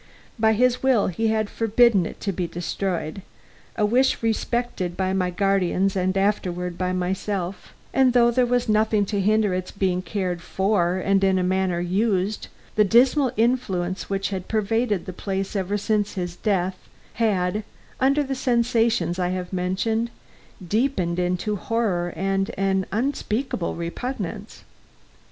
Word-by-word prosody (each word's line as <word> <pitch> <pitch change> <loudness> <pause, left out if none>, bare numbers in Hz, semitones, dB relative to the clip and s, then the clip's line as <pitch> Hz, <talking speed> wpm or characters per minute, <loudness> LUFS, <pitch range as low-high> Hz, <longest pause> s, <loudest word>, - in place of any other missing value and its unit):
By 220 0 +4
his 250 +3 +2
will 260 -6 +3
he 225 +6 -1
had 220 -1 +1
forbidden 225 -4 +3
it - - -10
to 200 - -1
be 180 -1 -2
destroyed 175 0 -3 0.5
a 210 - +2
wish 250 +3 +2
respected 225 -5 -1
by 190 0 0
my 185 -2 +1
guardians 195 0 +1
and 185 0 0
afterward 180 -3 0
by 185 +1 -1
myself 185 0 -3 0.2
and 265 -1 +4
though 240 -1 +5
there 250 +1 +2
was 245 0 +1
nothing 215 -1 +2
to 200 0 -1
hinder 210 0 +2
its 185 0 -3
being 185 -3 0
cared 185 -3 -3
for 190 -3 +1
and 195 +1 +1
in 190 -1 +3
a 185 - +1
manner 185 -1 +1
used, 195 +2 0 0.3
the 215 - +4
dismal 250 +5 +4
influence 200 -7 0
which 195 0 -1
had 190 -2 -5
pervaded 220 -2 0
the 185 - -6
place 195 +2 -3
ever 195 +1 -1
since 210 0 0
his 175 -2 -3
death 185 -2 -1 0.4
had, 205 -1 +1 0.4
under 275 +3 +3
the 270 -1 -3
sensations 235 -8 +1
I 180 - +1
have 180 0 -4
mentioned, 195 +6 0 0.6
deepened 190 -5 0
into 180 +4 -1
horror 195 -5 -1
and 195 +2 0
an 190 -1 +1
unspeakable 235 -4 -1
repugnance. 205 +3 -5
195 Hz, 145 wpm, -24 LUFS, 185-225 Hz, 0.6 s, though